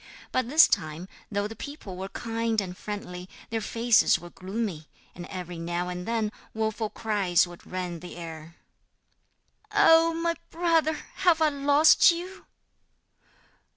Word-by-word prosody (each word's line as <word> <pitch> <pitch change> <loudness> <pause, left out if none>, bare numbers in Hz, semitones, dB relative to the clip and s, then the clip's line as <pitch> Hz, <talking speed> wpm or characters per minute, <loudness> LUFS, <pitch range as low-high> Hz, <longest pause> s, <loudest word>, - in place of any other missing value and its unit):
But 255 -2 0
this 310 +4 +7
time, 165 -1 -2 0.2
though 205 0 -1
the 225 - -9
people 285 -10 -8
were 190 +1 -6
kind 230 0 -2
and 185 -3 -4
friendly, 190 -3 -7 0.2
their 225 -1 -1
faces 230 +1 +3
were 175 0 -12
gloomy, 190 -5 -4 0.3
and 175 0 -9
every 180 -2 -7
now 175 +1 -2
and 180 +1 -6
then 225 -2 0 0.2
woeful 220 0 -1
cries 200 -7 +1
would 175 -1 -13
rend 180 -2 -4
the 180 - -9
air. 165 -1 -9 1.2
'Oh! 325 0 +5
my 335 0 0 0.2
brother, 325 -2 +1 0.2
have 355 -4 +4
I 315 -1 +4
lost 285 +2 +5
you?' 360 +3 -4
210 Hz, 140 wpm, -27 LUFS, 180-285 Hz, 1.2 s, this